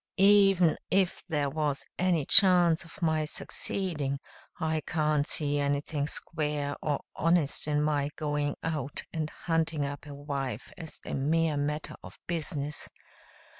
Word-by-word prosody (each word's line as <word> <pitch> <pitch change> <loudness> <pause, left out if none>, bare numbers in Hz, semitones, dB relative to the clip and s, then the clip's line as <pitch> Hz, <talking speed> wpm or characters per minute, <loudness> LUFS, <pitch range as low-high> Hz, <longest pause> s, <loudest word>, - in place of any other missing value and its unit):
Even 195 -4 +5
if 190 -2 +1
there 145 -2 0
was 150 -2 -1
any 175 -5 +2
chance 175 -4 +6
of 170 +2 -11
my 160 -1 +2
succeeding 150 -2 -2 0.4
I 160 0 0
can't 150 -2 +1
see 145 -1 +2
anything 145 +1 -1
square 150 -1 -3
or 150 -2 -1
honest 165 -3 +2
in 150 0 +1
my 145 -2 +1
going 145 -1 -1
out 150 -4 -3
and 155 -1 -2
hunting 160 -3 -1
up 145 +2 -6
a 145 - -8
wife 135 -5 -4
as 165 -4 -8
a - - -5
mere 155 +3 +1
matter 150 +1 -2
of - - -12
business. 150 -3 -2
150 Hz, 135 wpm, -29 LUFS, 145-165 Hz, 0.4 s, chance